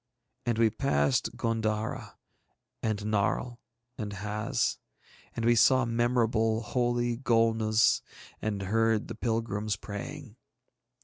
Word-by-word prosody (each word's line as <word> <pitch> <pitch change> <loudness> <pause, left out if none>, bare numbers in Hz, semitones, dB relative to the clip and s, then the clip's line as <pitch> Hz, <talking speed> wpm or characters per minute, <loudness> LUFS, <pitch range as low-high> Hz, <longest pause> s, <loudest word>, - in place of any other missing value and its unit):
And 120 -2 +1
we 115 -1 +4
passed 70 - +1
G├│ndara 110 -1 -2 0.7
and 110 -2 0
Narl 105 +3 -1 0.4
and 105 -2 -4
Haz. 105 +2 -1 0.6
And 115 - -2
we 120 - +5
saw 130 +2 +5
memorable, 115 -1 +1
holy 120 0 0
Golnuz, 115 -2 +3 0.4
and 105 -2 -2
heard 110 +2 +1
the - - -4
pilgrims 110 -3 -1
praying. 115 - -8
115 Hz, 105 wpm, -29 LUFS, 105-120 Hz, 0.7 s, we